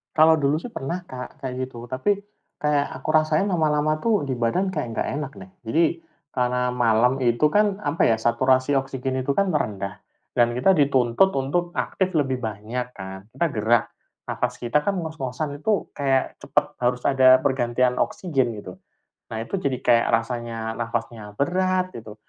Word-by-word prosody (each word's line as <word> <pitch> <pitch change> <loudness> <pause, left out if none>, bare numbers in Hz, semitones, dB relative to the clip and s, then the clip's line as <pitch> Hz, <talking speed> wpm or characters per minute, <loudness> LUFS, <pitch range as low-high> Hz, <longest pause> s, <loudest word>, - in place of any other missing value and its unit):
Kalau 160 +1 +6
dulu 150 0 +1
sih 175 - -7
pernah 175 +7 -5
Kak 125 0 -8
kayak 130 -1 -5
gitu, 120 -2 -10
tapi 130 - 0 0.4
kayak 150 -1 +1
aku - - -6
rasain 155 +5 +3
lama-lama 155 -4 +2
tuh 210 -11 +2
di 130 - -1
badan 120 +11 0
kayak 155 -9 -2
enggak - - -2
enak 150 -2 -4
nih. 190 -1 -12
Jadi, 160 +10 +3 0.5
karena 125 0 +1
malam 120 0 +3
itu 120 +5 +3
kan, 205 +3 +2
apa 170 - 0
ya? 115 - +4
Saturasi 130 +4 +2
oksigen 130 -1 -2
itu 140 - 0
kan 195 +8 +2
merendah. 100 - -3 0.3
Dan 120 0 +4
kita 125 +11 +3
dituntut 140 +4 +3
untuk 145 +6 -1
aktif 185 -1 -1
lebih 135 -6 0
banyak 110 +4 -4
kan. 95 -2 -8
Kita 170 - 0
gerak, 115 +2 +2 0.4
napas - - -2
kita 125 +5 +1
kan 195 -2 0
ngos-ngosan 145 -2 -4
itu 215 -2 +1
kayak 135 -2 +1
cepat - - 0
harus 125 0 +1
ada 130 -1 +6
pergantian 125 -1 +1
oksigen, 135 -9 0
gitu. 90 -3 -10 0.5
Nah, 110 0 -3
itu 195 +12 -3
jadi 140 -8 -1
kayak 115 -1 +4 0.2
rasanya 115 -2 -4
napasnya 115 -2 -4
berat, 185 - +1
gitu. 110 -2 -10
130 Hz, 165 wpm, -24 LUFS, 120-155 Hz, 0.5 s, Kalau